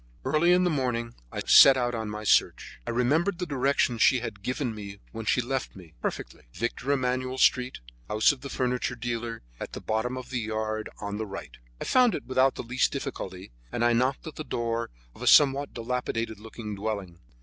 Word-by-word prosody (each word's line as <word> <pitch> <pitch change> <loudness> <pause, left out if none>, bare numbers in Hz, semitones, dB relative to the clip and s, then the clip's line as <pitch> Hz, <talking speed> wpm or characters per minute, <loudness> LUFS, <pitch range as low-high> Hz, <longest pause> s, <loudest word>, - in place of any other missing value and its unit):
Early 155 +6 +3
in 180 +1 +5
the 180 - +2
morning 120 -5 -1 0.2
I - - -4
set 135 -1 +8
out 120 -1 0
on 110 -2 -3
my 105 +1 -5
search. 105 - +2
I - - -2
remembered 155 +11 +1
the 180 - -2
directions 135 -5 +1
she 130 - +5
had 110 -5 -6
given 125 +2 -2
me 100 -2 -8
when 115 -1 -6
she 125 - +2
left 130 +1 -3
me, 90 -5 -13
perfectly—Victor 120 - -4
Emmanuel 130 -1 0
Street, 125 - +2 0.3
house 110 +5 +4
of 140 - -8
the 140 - -7
furniture 125 -1 -1
dealer, 115 -1 -4 0.2
at - - -6
the - - -5
bottom 115 +4 -2
of 130 0 -8
the 125 - -1
yard 110 -1 -3
on 100 0 -4
the 110 0 -3
right. 95 0 -8 0.2
I - - -4
found 250 -3 +4
it - - -6
without 130 +1 +2
the - - -5
least 125 +2 +1
difficulty, - - -6 0.2
and 120 - 0
I 120 - +4
knocked 130 +3 +1
at 160 - -8
the 155 - -4
door 115 -4 -2 0.2
of - - -16
a - - -3
somewhat 140 -1 +5
dilapidated 115 -2 -3
looking 110 0 -7
dwelling. 100 -4 -4
120 Hz, 200 wpm, -27 LUFS, 110-130 Hz, 0.3 s, set